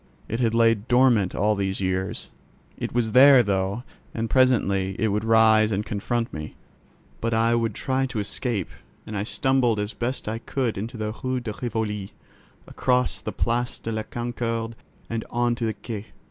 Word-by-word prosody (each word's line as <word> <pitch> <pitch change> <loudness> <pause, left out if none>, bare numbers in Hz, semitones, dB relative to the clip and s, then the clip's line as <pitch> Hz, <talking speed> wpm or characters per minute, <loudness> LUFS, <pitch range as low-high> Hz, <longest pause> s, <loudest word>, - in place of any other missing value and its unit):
It 115 - -3
had 115 -2 +1
lain 115 -2 +3
dormant 120 -6 +4
all 105 +2 +2
these 95 -1 -1
years: 95 0 -2 0.4
it - - -4
was 115 -2 0
there, 130 0 +8
though, 100 +2 -1 0.3
and 115 0 -2
presently 100 -7 +3
it 110 - +1
would 105 +1 0
rise 110 -1 +5
and 105 +1 -1
confront 115 +3 -2
me. 75 0 -6 0.6
But 115 0 0
I 115 +1 +3
would 115 -3 0
try 135 0 0
to 125 -3 -6
escape; 105 -1 -2 0.4
and 110 - -6
I 100 - -1
stumbled 120 0 +1
as 105 +2 -3
best 125 0 -3
I 110 +1 -2
could 125 -1 -2
into 115 +5 -5
the 110 0 -3
Rue 130 0 0
de 115 -3 -5
Rivoli, 105 -4 -3 0.5
across 125 0 0
the - - -4
Place 120 +1 -1
de 115 - -5
la 110 0 -1
Concorde 115 0 -3 0.3
and 115 -1 -3
on 120 0 +1
to 115 0 -3
the 110 - -2
Quai. 110 -2 -7
115 Hz, 175 wpm, -24 LUFS, 105-120 Hz, 0.6 s, there